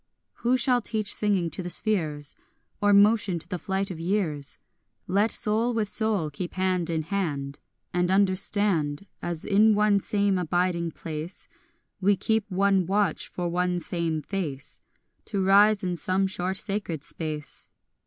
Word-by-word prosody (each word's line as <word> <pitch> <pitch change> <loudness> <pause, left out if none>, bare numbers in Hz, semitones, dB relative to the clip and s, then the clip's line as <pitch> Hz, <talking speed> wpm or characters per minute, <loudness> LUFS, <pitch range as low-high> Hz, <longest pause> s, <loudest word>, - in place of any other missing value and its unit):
6 - - -24
Who 245 +2 +3
shall 250 0 +2
teach 215 -2 -1
singing 195 -5 0
to - - -5
the 175 - -5
spheres, 155 -9 +1 0.5
Or 205 0 +4
motion 205 -2 +4
to 165 - -4
the 180 - -4
flight 195 +1 -2
of 165 - -7
years? 165 -6 -1 0.5
Let 200 +4 +2
soul 225 +3 0
with 215 -3 0
soul 210 -10 0
keep 175 +5 -6
hand 185 -2 0
in 160 -1 -1
hand 150 -7 -3 0.3
And 180 0 +1
understand, 190 -4 +2 0.2
As 170 -2 -3
in 215 +2 +4
one 210 -1 +3
same 200 -1 +1
abiding 175 0 0
place 160 +2 -7 0.5
We 200 +1 +3
keep 220 +2 0
one 195 -1 +2
watch 200 -3 0
for 175 -1 -4
one 180 +1 0
same 165 -3 -1
face 150 -8 -5 0.5
To 195 -3 -1
rise 205 +2 +5
in 180 -1 -1
some 185 +3 +1
short 190 0 -2
sacred 195 -8 -3
space. 155 -2 -5
185 Hz, 155 wpm, -26 LUFS, 170-205 Hz, 0.5 s, rise